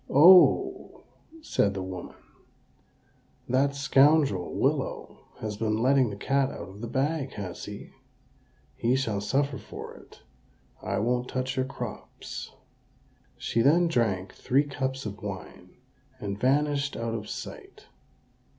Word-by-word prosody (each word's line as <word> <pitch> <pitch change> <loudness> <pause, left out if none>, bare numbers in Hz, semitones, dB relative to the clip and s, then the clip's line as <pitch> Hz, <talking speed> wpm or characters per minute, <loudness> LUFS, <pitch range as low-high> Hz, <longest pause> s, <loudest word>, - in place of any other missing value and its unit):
"Oho!" 175 +6 +6 0.4
said 100 - +1
the 95 - -3
woman, 95 -1 -7 1.3
"that 135 +3 +2
scoundrel, 135 - +3
Willow, - - -2 0.2
has 105 -2 -4
been 110 0 0
letting 130 +1 +3
the 100 - -6
cat 135 +6 +1
out 90 -8 -8
of 100 +2 -12
the 120 - -4
bag, 140 +2 -1
has 95 -4 -6
he? - - -9 0.8
He 120 +2 +1
shall 110 -7 -1
suffer 140 +6 0
for - - -9
it: - - -17 0.6
I - - -2
won't 125 +3 0
touch 130 +1 -2
your 130 -1 0
crops." 135 - -7 0.9
She 115 - 0
then 170 +7 +4
drank 100 - 0
three 135 +3 +2
cups 135 -2 -3
of 105 -1 -6
wine, 100 -2 -8 0.5
and 100 -1 -3
vanished 140 +2 +1
out 115 0 -3
of 110 -2 -5
sight. - - -8
130 Hz, 130 wpm, -27 LUFS, 105-140 Hz, 1.3 s, Oho